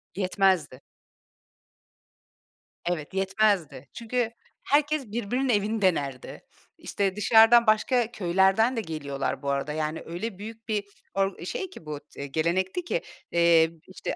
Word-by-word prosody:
Yetmezdi. 185 -8 +1 2.0
Evet, 175 -1 -3
yetmezdi. 195 -8 0
Çünkü 235 0 -2 0.3
herkes 295 -1 +1
birbirinin 245 +4 -1
evini 215 0 +1
denerdi. 140 -9 -1 0.4
İşte, 195 -1 -2
dışarıdan 225 +2 +6
başka 230 +2 +2
köylerden 195 +5 +2
de - - +1
geliyorlar 145 -6 -4
bu 140 - -3
arada. 140 +2 -2
Yani, 155 +1 -3
öyle 185 +4 -5
büyük 225 +2 -10
bir 210 -2 -1 0.3
or 195 -3 -1
şey 380 - -4
ki 165 - -13
bu, 150 -1 -5 0.2
t 140 - -6
gelenekti 180 - -1
ki. 485 +8 -2 0.3
Eee, 170 -1 +5
b - - -19
işte, 185 - -5
195 Hz, 125 wpm, -26 LUFS, 160-225 Hz, 2.0 s, dışarıdan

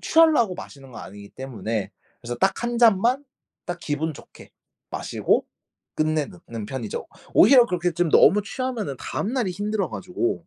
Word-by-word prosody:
취하려고 310 - +4
마시는 135 -6 -11
건 - - -8
아니기 100 +1 -11
때문에 115 -5 -4 0.3
그래서 120 +1 -5
딱 190 - +1
1 240 0 -1
잔만 235 +4 +4 0.4
딱 175 0 -4
기분 155 +1 -2
좋게 - - -15 0.4
마시고 - - 0 0.5
끝내는 155 +3 -1
는 115 -3 -6
편이죠. 115 -2 -5 0.3
오히려 255 -3 +7
그렇게 175 -3 -1
좀 170 0 0
너무 200 +9 +6
취하면은 220 - -4
다음 215 - -3
날이 245 -8 0
힘들어 205 +1 -2
가지고. 190 - -3
180 Hz, 335 characters per minute, -24 LUFS, -, 0.5 s, 오히려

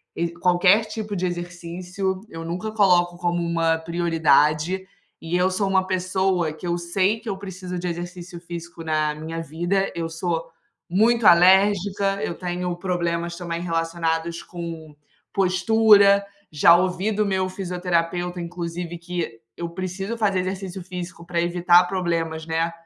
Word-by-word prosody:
ex 170 0 -2
qualquer 180 +4 +4
tipo 215 -1 -5
de 185 -1 -1
exercício. 175 +2 -4
Eu 165 -3 -7
nunca 175 +6 -4
coloco 175 -4 +3
como 175 0 -1
uma 165 -1 +1
prioridade, 165 +1 +2 0.4
e 165 +2 -1
eu 180 +1 +3
sou 195 +1 -1
uma 190 -1 +2
pessoa 185 -2 0
que 160 +3 -8
eu 170 0 0
sei 185 +5 0
que 230 - -6
eu 195 - -3
preciso 185 -2 -6
de 180 - -3
exercício 175 0 -6
físico 170 -1 -8
na 155 -1 0
minha 160 +2 -5
vida, 175 +5 -1
eu 165 -1 -3
sou 165 0 -3 0.4
muito 225 +5 +3
alérgica, 195 +1 +5
eu 170 - -2
tenho 180 0 -3
problemas 170 -2 -2
também 170 -1 -4
relacionados 165 0 -2
com 165 -3 -8 0.4
postura. 200 +1 +5 0.3
Já 155 +3 +6
ouvi 185 +3 +1
do 210 0 +1
meu 190 -2 0
fisioterapeuta 180 -1 -2
inclusive 170 0 -5
que 170 -9 -5 0.2
eu 170 0 -4
preciso 185 +5 -4
fazer 200 -4 +1
exercício 190 0 -5
físico 175 -2 -7
para 170 -1 -1
evitar 175 +1 +4
problemas, 170 -3 -2
né, 165 +1 0
175 Hz, 145 wpm, -23 LUFS, 170-190 Hz, 0.4 s, Já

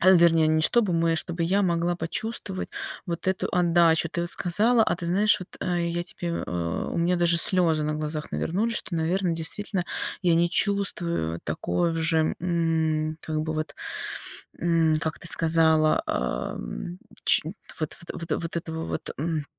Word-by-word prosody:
а 185 +2 +6
вернее 165 -3 +5
не 155 0 +2
чтобы 215 -1 +2
мы, 165 0 +1
а - - 0
чтобы 170 +1 -1
я 195 +4 +1
могла 175 -1 0
почувствовать 190 +2 -4 0.4
вот 170 +1 -3
эту 190 - -1
отдачу. 170 -2 +3
Ты 170 - -2
вот 175 - -4
сказала, 220 +8 +2
а 175 - 0
ты 170 - -6
знаешь, 200 +5 +3
вот, 180 - -9
а 180 - -1
я 170 0 -2
тебе 170 0 -6 0.2
э, 85 -2 -3
у - - -4
меня 175 +2 +1
даже 170 -1 +3
слезы 165 -3 +3
на 150 0 -1
глазах 150 0 -5
навернулись, 220 +7 -1
что, - - -4
наверно, 175 +3 0
действительно 180 +3 -2 0.4
я 175 -2 +3
не 170 +1 +2
чувствую 170 - +1
такое 90 - -1
в - - -4
же, 160 -1 +1
м, 160 -2 0
как 155 -1 -2
бы 155 0 -3
вот, 155 0 -4 0.8
м, 165 -2 +2
как 160 0 -3
ты 175 - +2
сказала, 160 -1 +4
ам, 60 - -4 0.3
чу 160 +2 +7 0.3
вот 155 - -3 0.2
вот - - -7
вот - - -1
вот 165 0 -4
этого 160 -1 -4
вот, - - -4
м, 155 0 -2
170 Hz, 175 wpm, -25 LUFS, 160-175 Hz, 0.8 s, чу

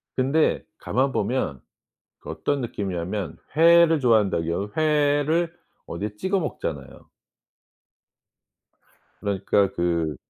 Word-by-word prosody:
근데 140 +5 +1
가만 135 +2 0
보면 105 - -2 0.6
그 - - -9
어떤 145 -1 -2
느낌이냐면 95 - -4 0.2
회를 165 -1 +6
좋아한다고요. 100 -5 +1
회를 155 +2 +2 0.3
어디에 105 +5 -5
찍어 190 - 0
먹잖아요. 75 - -6 2.1
그러니까 100 -1 +1
그 85 -3 -1
110 Hz, 220 characters per minute, -24 LUFS, 90-150 Hz, 2.1 s, 회를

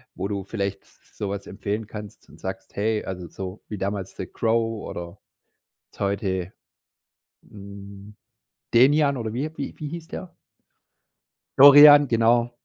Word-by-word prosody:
wo 95 - -3
du 100 -1 -4
vielleicht 100 -1 -4
s - - -27
so 100 - -3
was 100 0 -5
empfehlen 105 +2 -4
kannst 105 -2 -10
und - - -17
sagst: - - -7
„Hey“, 110 +1 -1
also, 90 -2 -6
so 95 +3 -8
wie 105 - -6
damals 95 -1 -4
The 95 - -5
Crow 115 -1 -1
oder 85 +2 -8 0.7
jetzt - - -23
heute, 100 -2 -2 0.9
hm, 100 0 -12 0.6
Denian 140 +3 +4
oder 110 -3 -4
wie 140 +6 -3
wie 140 - -5
wie 150 - -5
hieß 165 +1 -8
der? 180 -2 -8 1.2
Dorian, 145 +1 +10
genau. 120 0 +2
105 Hz, 140 wpm, -24 LUFS, 100-120 Hz, 1.2 s, Dorian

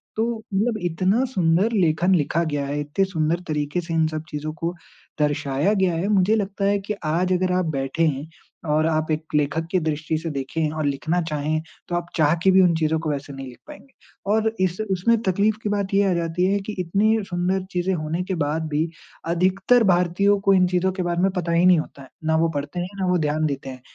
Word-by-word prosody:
तो 225 +1 +1 0.3
मतलब 215 +3 +1
इतना 185 +8 +1
सुंदर 190 -2 +1
लेखन 180 -1 +3
लिखा 165 +2 +1
गया 145 -3 -2
है, 145 +1 -3
इतते 150 +7 0
सुंदर 165 -2 0
तरीके 150 +3 -1
से 165 -1 -6
इन 160 -1 +3
सब 155 0 -4
चीज़ों 155 +1 -4
को 170 +1 -3 0.5
दर्शाया 145 +4 +1
गया 190 -4 +1
है। 180 +5 -1
मुझे 205 +1 +3
लगता 200 -1 -2
है 200 0 +3
कि 205 +2 -4
आज 180 +4 +1
अगर 185 0 +1
आप 180 -1 +1
बैठे 135 +5 -1
हैं 145 +1 -2 0.4
और 155 +1 +2
आप 155 0 0
एक 155 +1 -1
लेखक 150 +2 +1
की 185 - +3
दृष्टि 155 0 -2
से 165 +1 -4
देखें 145 +3 -2
और 155 -1 -3
लिखना 155 +5 0
चाहें, 155 +1 -1 0.3
तो 175 - -2
आप 175 0 -2
चाह 155 -1 +3
के 190 - +5
भी 190 0 +6
उन 175 -2 +4
चीज़ों 160 0 +1
को 160 -2 -3
वैसे 140 -1 -4
नहीं 135 -1 -7
लिख 125 - -12
पाएँगे। 290 -3 -13 0.4
और 220 +1 +2
इस 185 +1 0
उसमें 210 +6 +2
तकलीफ 200 +3 +1
की 210 - -1
बात 200 -1 -2
ये 200 +1 +4
आ - - +2
जाती 170 +1 0
है 200 - +1
कि 215 - -3
इतने 205 +6 +2
सुंदर 180 +2 0
चीज़ें 180 +1 0
होने 165 +2 -2
के 190 0 -3
बाद 160 +2 -2
भी 155 +2 0 0.4
अधिकतर 190 +7 +3
भारतीयों 190 +2 +3
को 195 0 +4
इन 180 -1 +4
चीज़ों 185 +1 +1
के 185 -1 -3
बारे 175 0 -1
में 190 0 +3
पता 170 -1 -1
ही 170 +2 +3
नहीं 180 -3 +6
होता 140 - -7
है। 130 - -15 0.2
ना 160 0 +2
वो 165 0 +2
पढ़ते 145 +5 -3
हैं, 175 - -2
ना - - +1
वो 180 0 +3
ध्यान 155 0 0
देते 135 -2 -3
हैं। 130 -1 -9
170 Hz, 230 wpm, -23 LUFS, 155-190 Hz, 0.5 s, भी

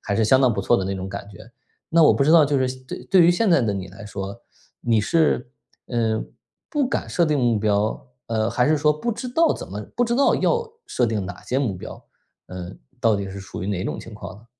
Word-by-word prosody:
还 100 - -2
是 110 - +3
相 130 +5 +5
当 130 -3 +4
不 100 - -2
错 120 - +3
的” 95 - -1
那 100 - -2
种 95 -1 -5
感 100 +1 -7
觉。 105 +3 -14 0.4
那 165 0 +5
我 150 - +6
不 140 - +2
知 155 - +4
道 165 -2 +7
就 140 -1 +1
是 130 - +2
现 130 0 -6
对 - - -7
对 190 -2 +5
于 170 - +6
现 200 +4 +2
在 165 - +5
的 110 -4 0
你 95 -1 -5
来 95 +3 -11
说， 100 -1 -6 0.4
你 115 -2 +2
是， 140 0 +1 0.4
呃， 115 -2 0 0.5
不 290 -5 0
敢 - - -2
设 170 -3 +2
定 150 -2 +1
目 120 -4 +2
标， 105 +3 0 0.2
呃， 110 -1 0
还 125 - +1
是 155 - +3
说 150 +1 +3
不 235 +11 -3
知 250 +3 -6
道 325 +7 +3
怎 - - -7
么 105 +3 -6
不 245 - +1
知 235 0 0
道 275 - +4
要 470 0 +1 0.2
设 125 - 0
定 105 -4 -2
哪 100 - -8
些 130 - -1
目 125 -8 -1
标。 - - -9 0.4
呃， 90 0 -7 0.3
到 115 -2 +3
底 100 -1 -4
是 100 - -7
属 95 -2 -8
于 - - -3
哪 95 -2 -2
种 - - -4
情 115 - -11
况 105 - -8
呢？ 110 +3 -18
115 Hz, 275 characters per minute, -23 LUFS, 100-155 Hz, 0.5 s, 道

